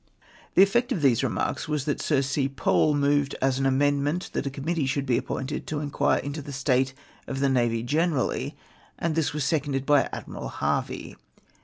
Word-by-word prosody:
The 190 - +8
effect 240 +6 +2
of 175 -11 -1
these 125 -5 +4
remarks - - -1
was, 150 -3 -1
that 145 - -1
Sir 140 -3 +2
C. 135 0 0
Pole 145 +2 +2
moved 145 0 +2
as 135 0 +1
an 135 - +2
amendment 145 +5 +1
that - - -1
a - - 0
Committee 145 +2 -2
should 140 +1 -1
be 125 -3 +2
appointed 135 +3 -4
to 155 - -2
inquire 145 -1 +1
uito 145 +2 -4
the 145 - -8
state 135 -1 +1 0.3
of 135 - -3
the 140 0 +2
navy 120 -3 +1
gene 155 +8 +2
rally, 130 - -2 0.4
and 165 -1 -1
this 155 -2 +1
was 150 -1 -2
seconded 140 -2 0
l3y 145 -2 +4
Admiral - - -6
Harvey. - - -2
140 Hz, 190 wpm, -26 LUFS, 135-150 Hz, 0.4 s, The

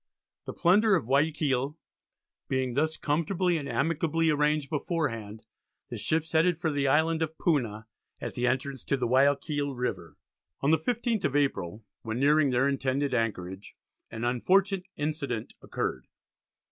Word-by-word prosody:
The - - -5
plunder 205 +4 +4
of 170 - -1
Guiaquil 140 0 +1 0.7
being 130 -2 -1
thus 155 +4 0
comfortably 170 +3 0
and 140 -1 -6
amicably 165 0 +1
arranged 150 0 +1
beforehand, 115 - -3 0.5
the - - -4
ships 160 0 -1
headed 165 +1 +3
for 165 -3 0
the 140 -1 0
Island 160 +3 +2
of 160 0 -2
Puna, 115 -10 0 0.3
at - - -5
the 125 0 0
entrance 130 +1 -2
to 140 - +1
Guiaquil 140 +3 +1
River. 90 - -4 0.4
On 140 - +2
the 160 - +4
15th 235 - -1
of 140 - 0
April, 110 -8 -1 0.2
when 110 +1 -4
nearing 145 +1 +4
their 125 +2 +2
intended 135 0 0
anchorage, 95 -5 -3 0.3
an 115 0 -6
unfortunate 185 - +2
incident 145 -6 -3
occurred. 65 - -4
145 Hz, 140 wpm, -28 LUFS, 125-160 Hz, 0.7 s, plunder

